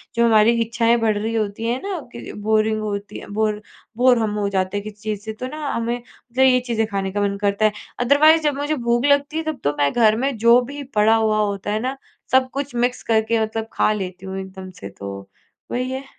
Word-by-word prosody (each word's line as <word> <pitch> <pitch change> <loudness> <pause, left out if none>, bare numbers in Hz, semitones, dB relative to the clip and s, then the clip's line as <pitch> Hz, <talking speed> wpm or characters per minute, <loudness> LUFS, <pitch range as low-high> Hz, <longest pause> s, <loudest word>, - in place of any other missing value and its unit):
जो 235 - +3
हमारी 220 0 +5
इच्छाएँ 230 +1 +2
बढ़ 220 -2 +1
रही 220 +2 -2
होती 215 0 -2
हैं 245 +2 -1
ना 390 -4 -3
कि 235 - -8
बोरिंग 215 +1 +1
होती 205 -1 -4
है - - -11
बोर, 215 0 0 0.4
बोर 250 0 +5
हम 220 -2 0
हो 205 - 0
जाते 190 0 -1
हैं 205 - -4
किसी 215 0 -8
चीज़ 210 -2 -3
से, 220 - -4
तो 250 +4 -6
ना 300 +2 -5
हमें 235 +1 -2 0.3
फिर 265 +1 +5
ये 255 -1 +5
चीज़ें 225 -2 +1
खाने 195 -2 -2
का 205 +1 -1
मन 200 0 0
करता 200 +1 +1
है। 215 - +4 0.3
अदरवाइज़ 300 +6 +5
जब 295 -2 +1
मुझे 290 +2 -1
भूख 240 -1 0
लगती 285 +2 +2
है, 325 - -1
तब 315 -3 -4
तो 145 - +1
मैं 145 -1 +2
घर 220 -3 +4
में 275 -1 -1
जो 235 +2 +6
भी 285 0 -6
पड़ा 215 +2 +5
हुआ 220 -1 +2
होता 205 -1 -1
है 215 - 0
ना, 260 +4 -3 0.3
सब 260 0 +4
कुछ 280 -2 -4
मिक्स 245 +1 0
करके 225 0 +1
मतलब 220 0 -2
खा - - +2
लेती 190 -2 -6
हूँ 190 0 -5
एकदम 190 0 -8
से। 100 - -6
तो 100 0 -8 0.6
वही 255 +1 -1
है, 265 +1 -4
220 Hz, 235 wpm, -21 LUFS, 205-250 Hz, 0.6 s, जो